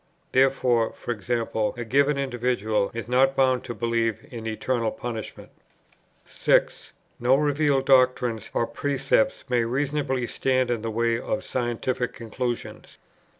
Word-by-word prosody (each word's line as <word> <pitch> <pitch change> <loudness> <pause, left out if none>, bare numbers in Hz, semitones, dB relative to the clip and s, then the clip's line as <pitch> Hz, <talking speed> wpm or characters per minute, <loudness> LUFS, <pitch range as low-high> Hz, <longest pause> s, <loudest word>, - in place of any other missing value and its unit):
Therefore, 130 -3 +2
e.g. 115 0 -4
a 115 0 -1
given 140 +4 +2
individual 120 -6 0
is 115 0 -6
not 135 +2 +3
bound 130 -2 +2
to 120 - -5
believe 115 +1 -1
in 115 -2 -6
eternal 115 +1 -1
punishment. 115 -1 -7 0.7
6. - - +1 0.3
No 125 +2 +4
revealed 145 -1 +1
doctrines 125 -4 +3
or 115 - +2
precepts 145 - 0
may 125 -2 +2
reasonably 130 +1 -1
stand 130 0 0
in 115 -2 -1
the 115 - -3
way 115 +1 0
of - - -3
scientific 125 0 -2
conclusions. 120 +1 -5
125 Hz, 125 wpm, -25 LUFS, 115-135 Hz, 0.7 s, No